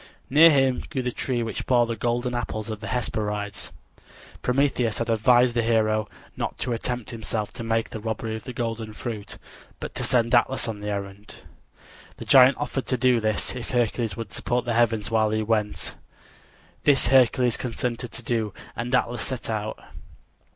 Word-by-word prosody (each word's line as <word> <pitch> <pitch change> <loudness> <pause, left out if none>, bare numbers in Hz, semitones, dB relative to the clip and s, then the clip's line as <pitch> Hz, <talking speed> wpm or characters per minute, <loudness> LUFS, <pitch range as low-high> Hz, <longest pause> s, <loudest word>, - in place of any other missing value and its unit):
Near 160 +4 +8
him 135 -4 +3
grew 135 -5 -2
the 125 - -1
tree 120 -1 -2
which 115 - -4
bore 120 -2 +4
the 115 0 -3
golden 120 +2 -1
apples 110 -2 -3
of 110 - -5
the 110 - -7
Hesperides. 105 -3 -2 0.7
Prometheus 125 -3 +1
had 115 0 -1
advised 120 +2 +4
the 120 - +2
hero 110 -2 +2 0.3
not - - -3
to 125 - -2
attempt 120 0 -3
himself 110 -2 -4
to 120 - -6
make 115 0 0
the 110 - -5
robbery 110 0 -3
of 110 - -8
the - - -5
golden 115 -3 -4
fruit, 105 -2 -6 0.4
but - - -6
to - - -3
send 120 -2 +1
Atlas 120 +1 +3
on 110 -2 -4
the 105 0 -4
errand. 100 0 -6 0.8
The - - -8
giant 130 0 +7
offered 140 -2 -3
to 130 - 0
do 125 -1 +3
this 110 +2 -1
if 125 - -6
Hercules 120 -4 0
would 110 -5 -6
support 120 0 -1
the 120 - 0
heavens 115 -2 +1
while 110 -1 +3
he 110 0 0
went. 105 -1 -1 0.9
This 140 -4 +4
Hercules 125 -2 +4
consented 125 -1 -3
to 120 - -7
do, 110 -4 -1 0.2
and 120 +2 -1
Atlas 120 -2 0
set 130 -4 -4
out. 110 0 -3
115 Hz, 180 wpm, -25 LUFS, 110-125 Hz, 0.9 s, Near